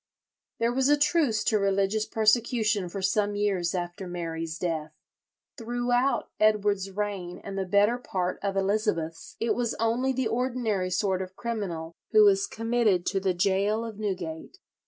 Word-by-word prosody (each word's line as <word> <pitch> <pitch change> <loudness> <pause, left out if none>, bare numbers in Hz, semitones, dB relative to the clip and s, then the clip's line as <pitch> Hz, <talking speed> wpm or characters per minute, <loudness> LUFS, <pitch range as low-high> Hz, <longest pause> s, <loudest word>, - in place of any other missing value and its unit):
There 230 +1 +1
was 265 +2 +2
a 295 - +5
truce 290 -8 +2
to 215 - +2
religious 200 +2 +1
persecution 220 -3 +2
for 195 +2 -5
some 205 +1 +1
years 195 -4 0
after 175 +1 -4
Mary's 165 -2 -4
death. 160 -3 -3 0.7
Throughout 245 +3 0
Edward's 205 -2 +2
reign 195 -3 -4
and 195 - -6
the 190 -1 -2
better 205 +5 +3
part 185 -6 -2
of 195 -1 -2
Elizabeth's 195 -5 -1
it 230 - +1
was 240 -2 -1
only 235 +4 +1
the 260 -2 0
ordinary 230 -5 -1
sort 190 +1 0
of 185 0 -7
criminal 185 -9 -4 0.2
who 430 - +8
was 390 -1 +4
committed 225 - +1
to 195 - 0
the 190 -2 0
gaol 200 +5 +1
of 220 -2 -8
Newgate. 185 - -4
205 Hz, 155 wpm, -27 LUFS, 185-230 Hz, 0.7 s, who